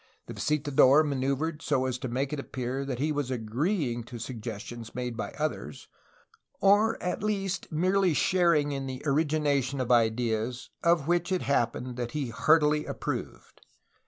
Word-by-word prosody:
The - - -8
visitador 145 -1 +4
maneuvered 140 +3 -1
so 135 -5 +1
as 130 -1 -2
to 130 - -4
make 135 +4 -2
it 150 - -2
appear 130 0 -4
that 130 -3 -3
he 150 +4 0
was 145 -3 -2
agreeing 125 - -1
to 120 - -8
suggestions 115 -1 -7
made 125 -1 -3
by 115 - -4
others, 145 - -4 0.7
or 205 +3 +4
at 180 +1 -2
least 195 -4 -2
merely 185 +1 +2
sharing 170 -4 +3
in 135 -1 -3
the 130 0 -6
origination 145 -2 +1
of 125 -1 -1
ideas 115 0 +1
of 170 -4 +3
which 175 +1 +1
it 185 - 0
happened 125 -2 -1
that 120 -1 -4
he 145 -5 -2
heartily 150 +4 +3
approved. - - -5
140 Hz, 155 wpm, -28 LUFS, 125-155 Hz, 0.7 s, visitador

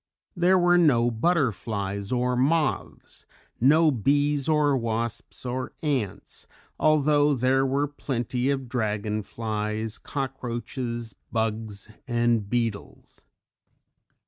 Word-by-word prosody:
There 180 +1 +4
were 175 0 +4
no 120 -8 +4
butterflies 110 - -1
or 125 0 +1
moths, 150 +3 -1 0.3
no 155 +5 +5
bees 145 +4 +1
or 150 -2 +3
wasps 115 0 -3
or 130 +1 -3
ants 115 - -3 0.3
although 150 -1 +3
there 130 +2 +2
were 140 +2 +1
plenty 130 -2 -2
of 135 -2 -1
dragonflies, 110 -1 -3
cockroaches, 120 -3 -4 0.2
bugs 110 -2 -2 0.2
and 120 -4 +1
beetles. 115 -3 -4
125 Hz, 90 wpm, -26 LUFS, 110-145 Hz, 0.3 s, no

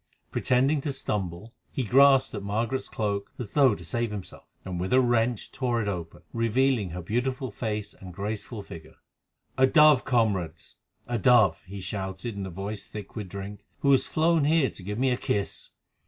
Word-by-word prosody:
Pretending 135 +3 +2
to 145 - -2
stumble, 100 -3 -3 0.2
he 130 - -2
grasped 135 +3 +5
at 105 - -4
Margaret's 115 +6 -2
cloak 100 -2 -2
as 120 -5 -6
though 135 -7 +5
to 85 - -11
save 115 +7 -1
himself, 105 -3 -8 0.2
and 90 -2 -4
with 95 +6 -2
a 130 - +6
wrench 120 -2 +1
tore 120 -3 -1
it 110 - -2
open, 85 -5 -5
revealing 115 -2 +1
her 90 +1 -6
beautiful 125 +5 -2
face 105 -1 -4
and 95 -1 -11
graceful 105 +3 -5
figure. 80 -5 -11 0.6
"A 130 - +6
dove, 150 -2 +6
comrades!—a 110 0 -2
dove!" 110 -1 +5
he 100 +1 -7
shouted 95 +3 -4
in 100 -1 -4
a - - -6
voice 100 +4 -6
thick 105 -2 -9
with 105 -5 -5
drink, 100 +2 -7 0.2
"who 140 - +4
has 135 - +4
flown 160 -1 +2
here 155 -2 +3
to - - -11
give 105 +3 -4
me 130 +1 +2
a 125 - +1
kiss." 100 -4 -2
110 Hz, 180 wpm, -27 LUFS, 100-130 Hz, 0.6 s, a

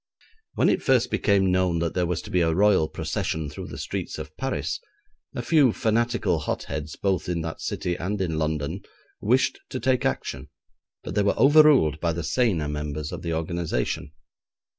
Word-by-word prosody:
When - - +3
it - - +2
first 130 -3 +2
became 95 -2 +2
known 90 -2 +2
that 85 0 -1
there 90 -1 0
was 90 -1 -2
to - - -9
be 90 - +2
a 80 -1 +2
Royal 100 -4 +4
procession 80 -2 -3
through - - -7
the - - -8
streets - - -4
of - - -8
Paris, - - -2 0.6
a 120 - -3
few 145 -3 +4
fanatical 110 -5 +1
hot - - -3
heads, 75 0 -5
both 95 -2 -1
in 85 -2 -1
that 80 0 -5
city 90 - -2
and 100 +4 -3
in 80 -4 -1
London, 80 +3 -2 0.4
wished 130 +4 +2
to 130 - -4
take 130 -1 +1
action, 65 +2 -2 0.5
but - - -6
they 105 - +2
were 100 - +1
overruled 135 - +6
by 85 0 0
the 85 +1 -4
saner 95 -7 +1
members 75 0 -4
of - - -6
the 85 -2 -2
organisation. 80 -4 -2
90 Hz, 185 wpm, -25 LUFS, 80-110 Hz, 0.6 s, overruled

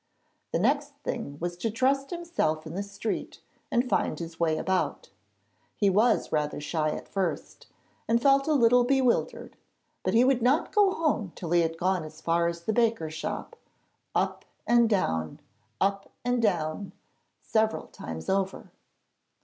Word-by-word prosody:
The - - +1
next - - +1
thing 140 0 -4
was 175 +1 -3
to 225 +6 -1
trust 270 +5 +1
himself 335 - -1
in 160 - -7
the 195 - -2
street, 200 +2 -4 0.3
and 250 -3 +1
find - - 0
his 165 -1 -7
way 160 -2 +2
about. 190 +2 -1 0.6
He 200 -2 +3
was 220 +4 +3
rather 150 -1 -1
shy 155 +1 -1
at - - -5
first, 190 -3 -3 0.4
and 230 +1 +3
felt 275 +3 +4
a 310 - +3
little 245 -2 +5
bewildered, 260 -1 +1 0.5
but - - 0
he 235 - +6
would 255 -1 +3
not 260 +6 +2
go 410 -2 +5
home 275 - -1
till 170 -2 -6
he 175 0 +5
had 165 0 -1
gone 185 0 +1
as 155 0 -10
far 170 +1 +1
as 170 0 -3
the 220 +6 -1
baker's 225 -9 +1
shop 155 - -5 0.6
up - - 0 0.2
and 235 -1 +4
down, 80 - 0 0.4
up 195 +1 0 0.2
and 245 -1 +1
down, 180 -2 -1 0.5
several 220 0 0
times 80 0 -8
over. 195 0 -1
200 Hz, 155 wpm, -28 LUFS, 165-245 Hz, 0.6 s, he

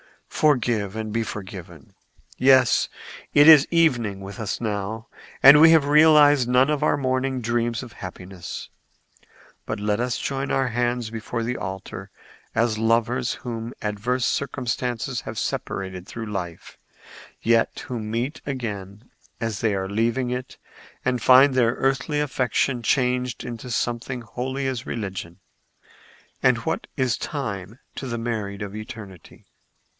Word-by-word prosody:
Forgive 120 -9 +1
and 110 -1 -4
be 115 - +1
forgiven. 95 -8 -8 0.4
Yes; 130 -2 +4 0.5
it 145 +1 +7
is 155 -3 +9
evening 120 - +2
with 100 +4 -8
us 110 -3 -3
now, 110 0 -3 0.4
and 140 +2 +10
we 160 - +9
have 160 -3 +5
realized 145 -3 +6
none 130 +3 +4
of 150 - 0
our - - +2
morning 130 -1 -1
dreams 120 +1 -1
of 120 - -11
happiness. 90 -1 -8 1.0
But - - -3
let 105 +1 0
us 125 0 -1
join 135 0 -3
our 135 -1 +1
hands 120 -1 -1
before 115 +1 -4
the 125 +2 -2
altar 95 -1 -6 0.5
as 115 -1 +1
lovers 115 +2 +1
whom 115 0 -6
adverse 110 +4 -1
circumstances 125 -3 -2
have - - -7
separated 95 -1 -4
through 115 0 -6
life, 95 -6 -6 0.6
yet 115 0 +2
who 125 -2 -4
meet 115 +6 -3
again 105 -5 -6 0.3
as 115 -3 -3
they 110 -3 +1
are 95 0 -2
leaving 115 +5 0
it 125 +1 -5 0.5
and 125 -2 0
find 130 +3 +7
their 120 -2 +2
earthly 135 +3 0
affection 130 -2 0
changed 125 0 0
into 120 0 -7
something 120 +1 -2
holy 130 +4 -4
as 130 -2 -3
religion. 95 -6 -5 1.0
And - - +4
what - - -3
is 130 -3 +1
time 110 - -5 0.2
to 135 - -5
the 120 -1 -3
married 110 -4 -3
of 100 0 -7
eternity?" 110 - -10
120 Hz, 140 wpm, -24 LUFS, 105-130 Hz, 1.0 s, and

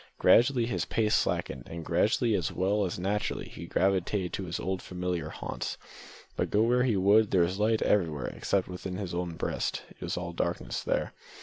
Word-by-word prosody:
Gradually 120 0 +5
his 120 - -1
pace 110 -2 +1
slackened, - - 0
and 80 -1 -6
gradually - - +2
as - - 0
well 100 +2 +1
as 90 - -3
naturally 100 +4 -2
he 85 - -9
gravitated 95 0 +1
to 95 - -3
his 85 -1 -4
old 95 -1 -2
familiar 90 -3 -3
haunts; - - -5 0.6
but - - -1
go 105 +1 +3
where 125 +2 +3
he 120 -5 +2
would, 100 +3 +5
there 90 - +3
was 90 +3 -1
light 110 +1 +2
everywhere 80 -8 +1
except 95 -2 -1
within 90 0 -6
his 95 -4 -4
own 85 -1 -3
breast. - - -2
It - - -19
was - - -3
all 85 -1 -4
darkness 85 +1 -2
there. - - -1
95 Hz, 190 wpm, -29 LUFS, 90-105 Hz, 0.6 s, Gradually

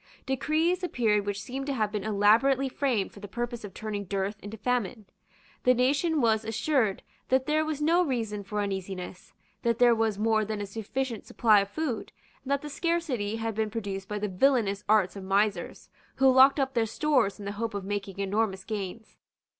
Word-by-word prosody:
Decrees 315 +7 +1
appeared 215 - +1
which 205 0 -3
seemed 270 +2 -5
to 280 - -1
have 215 -3 0
been 210 -2 -3
elaborately 220 +6 +3
framed 255 -7 -1
for - - -13
the 205 - -8
purpose 240 +3 -4
of 205 - -7
turning 205 +1 -5
dearth 195 +2 -2
into 205 +2 -8
famine. 235 -1 -2 0.6
The 250 0 +4
nation 285 +5 +2
was 220 -2 +2
assured 225 -1 0 0.3
that 260 0 +3
there 310 +2 +2
was 310 -1 -3
no 340 +4 +4
reason 225 - -2
for 210 +2 -3
uneasiness, 190 -2 -5 0.3
that 235 -1 +1
there 245 -1 +6
was 225 -2 0
more 220 0 +2
than 215 0 -3
a 205 - -3
sufficient 225 +4 -4
supply 215 -3 +4
of 200 0 -2
food, 285 -1 -3 0.3
and 265 - -9
that 280 0 0
the - - -5
scarcity 290 - -1
had 225 0 -2
been 220 0 -1
produced 200 -3 -5
by 210 - -3
the 210 0 -2
villanous 205 -1 +2
arts 210 -4 +3
of 195 - -7
misers, 200 +2 -1 0.2
who 265 0 +5
locked 265 +3 +6
up 270 -1 0
their 230 -3 +1
stores 240 -4 +1
in 205 - -9
the 200 - -3
hope 220 +1 -4
of 200 -2 -4
making 200 -1 -4
enormous 200 0 -1
gains. 215 +1 -6
220 Hz, 195 wpm, -28 LUFS, 205-265 Hz, 0.6 s, there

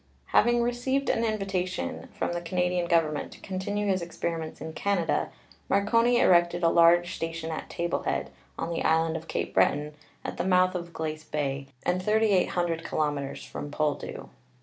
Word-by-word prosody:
Having 240 +1 +4
received 255 +3 0
an 230 - 0
invitation 195 -4 -2
from - - -1
the 175 - -2
Canadian 180 0 0
Gov 165 -2 +3
ernment 145 - -4
to - - -14
continue 200 +2 -2
his 190 -2 +1
experiments 165 -1 -4
in 160 +2 -6
Canada, 195 -4 0 0.4
Marconi 230 +5 +3
erected 175 0 +4
a 165 - +6
large 175 +1 +5
station 165 0 -4
at 160 - -5
Table 170 -1 -2
Head, - - -2 0.3
on 170 - -3
the - - -2
island 160 0 +2
of 165 0 -6
Cape - - -3
Breton, 150 +1 +2 0.3
at - - -4
the - - 0
mouth 185 0 +3
of 170 -1 -5
Glace 155 -1 -4
Bay, 140 -3 -3 0.2
and 180 +1 +1
3,800 185 -5 +2
kilo 155 -2 0
meters 140 -1 -5
from 145 - -6
Poldhu. 145 -1 -2
175 Hz, 170 wpm, -27 LUFS, 160-195 Hz, 0.4 s, a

